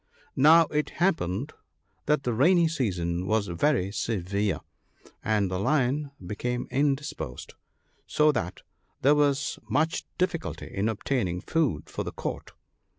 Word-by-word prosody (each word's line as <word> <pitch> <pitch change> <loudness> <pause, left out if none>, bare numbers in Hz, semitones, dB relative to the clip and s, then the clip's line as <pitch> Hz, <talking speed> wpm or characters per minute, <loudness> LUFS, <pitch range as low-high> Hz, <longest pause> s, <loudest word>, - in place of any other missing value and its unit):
Now 160 +5 +7
it 150 0 0
happened 145 - 0 0.5
that 150 -1 +2
the 120 - 0
rainy 170 +8 +4
season 90 - -1
was 110 0 +2
very 95 - +1
severe, 100 -1 -1 0.6
and 105 -3 +1
the 90 - -1
Lion 140 +4 +1 0.2
became 120 +6 -3
indisposed, 140 - -2 0.5
so 150 0 +4
that 90 - -4 0.4
there 140 +3 +6
was 145 0 +1
much 160 +2 0
difficulty 180 -2 -2
in 100 +3 0
obtaining 105 -5 -1
food 105 - 0
for - - -4
the - - -5
Court. - - -5
125 Hz, 125 wpm, -27 LUFS, 100-150 Hz, 0.6 s, Now